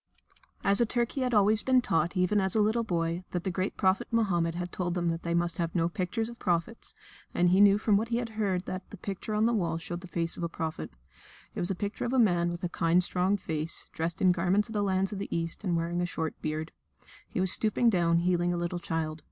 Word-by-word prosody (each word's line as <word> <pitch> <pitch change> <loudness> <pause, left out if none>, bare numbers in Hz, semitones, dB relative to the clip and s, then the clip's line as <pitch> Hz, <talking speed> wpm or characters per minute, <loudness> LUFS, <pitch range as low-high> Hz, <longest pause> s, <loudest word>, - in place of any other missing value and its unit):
As 200 +3 +3
a - - +5
Turk 240 0 0
he 275 - -3
had 250 -1 0
always 210 +1 +4
been 260 -1 +4
taught, 175 -6 0
even 185 +3 +2
as 190 +1 +1
a - - +3
little 220 +3 +2
boy, 170 -3 -1
that 175 -1 -2
the 190 - -1
great 185 +2 -2
Prophet 190 -1 +2
Mohammed 175 -8 +1
had 175 0 -4
told 175 -1 -2
them 175 -1 0
they 170 0 -3
must 170 0 -1
have 165 0 -2
no 165 -1 +2
pictures 200 +5 -2
of 235 0 -10
prophets, 175 +5 -2 0.4
and 175 0 +3
he 190 +2 +5
knew 200 0 +7
from 210 -1 +3
what 220 +3 -1
he 235 0 0
had 240 -1 -3
heard 200 -5 -1
that 185 0 -6
the 205 - -10
picture 200 +3 -4
on 215 +1 +3
the 235 - +2
wall 170 -7 0
showed 175 +1 -6
the 185 - -9
face 170 -1 0
of - - -6
a 170 - -1
prophet. 160 - -4 0.6
It - - -5
was 175 - -1
a 195 - -1
picture 205 +3 -3
of 240 - -2
a - - +2
man 175 -7 +3
with 175 +1 -6
a 180 - -1
kind, 170 +2 +2
strong 185 +3 +1
face, 160 -3 -4
dressed 165 +3 -3
in 185 - +6
garments 185 +4 +1
of - - -7
the 210 - 0
lands 195 0 0
of 200 - -5
the 200 - -5
East, 165 +4 -3
and 175 -4 +1
wearing 170 +1 -1
a 175 - 0
short 160 -3 -3
beard. 155 +1 -3 0.6
He - - -4
was 185 -1 +3
stooping 225 +3 +3
down 170 -3 +2
healing 175 0 +1
a 175 - -1
little 175 +1 -2
child. 160 -4 -3
180 Hz, 255 wpm, -29 LUFS, 170-205 Hz, 0.6 s, knew